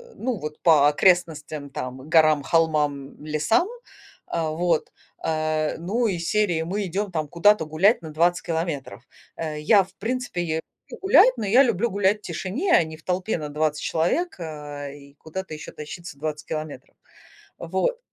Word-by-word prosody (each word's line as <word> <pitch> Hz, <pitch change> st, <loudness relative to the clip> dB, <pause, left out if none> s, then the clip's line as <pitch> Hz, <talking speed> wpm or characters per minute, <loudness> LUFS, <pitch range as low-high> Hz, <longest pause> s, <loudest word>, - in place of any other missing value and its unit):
ну, 245 Hz, -2 st, -2 dB
вот, 150 Hz, -1 st, -6 dB
по 150 Hz, -4 st, +6 dB
окрестностям, 155 Hz, -3 st, +1 dB
там, 130 Hz, +1 st, -7 dB
горам, 155 Hz, -2 st, +5 dB
холмам, 150 Hz, -4 st, 0 dB
лесам, 155 Hz, -, +1 dB, 0.6 s
а, 165 Hz, -2 st, -1 dB
вот, 165 Hz, 0 st, 0 dB, 0.3 s
а, 155 Hz, -1 st, -1 dB
ну, 215 Hz, +8 st, 0 dB
из 170 Hz, -4 st, -2 dB
серии: 190 Hz, -6 st, +1 dB
"Мы 195 Hz, +5 st, -2 dB
идём 195 Hz, +3 st, -3 dB, 0.2 s
куда-то 175 Hz, +2 st, +4 dB
гулять 170 Hz, +9 st, +3 dB
на 160 Hz, -, -8 dB
20 175 Hz, +3 st, +2 dB
километров". 160 Hz, -6 st, -4 dB, 0.3 s
Э, 155 Hz, -2 st, -4 dB
я, 195 Hz, +6 st, +5 dB
в 185 Hz, -, -18 dB
принципе, 245 Hz, -4 st, -2 dB
я 160 Hz, -1 st, -2 dB, 0.3 s
люблю -, -, -8 dB
гулять, 385 Hz, -, +6 dB
но 220 Hz, -, -3 dB
я 240 Hz, +7 st, +6 dB
люблю 235 Hz, -2 st, +1 dB
гулять 200 Hz, +1 st, +2 dB
в -, -, -32 dB
тишине, 200 Hz, -, -2 dB
а -, -, +6 dB
не 160 Hz, -1 st, -8 dB
в 155 Hz, -, -21 dB
толпе 185 Hz, +2 st, -1 dB
на 150 Hz, -2 st, -5 dB
20 155 Hz, 0 st, -1 dB
человек, 240 Hz, -, 0 dB
а, 150 Hz, -3 st, -6 dB
и 140 Hz, 0 st, -13 dB
куда-то 165 Hz, +4 st, -7 dB
ещё 155 Hz, -, -8 dB
тащиться 160 Hz, +1 st, -9 dB
20 150 Hz, 0 st, -4 dB
километров. 155 Hz, -4 st, -6 dB, 0.6 s
Вот. 190 Hz, -, -1 dB
165 Hz, 160 wpm, -24 LUFS, 150-190 Hz, 0.6 s, по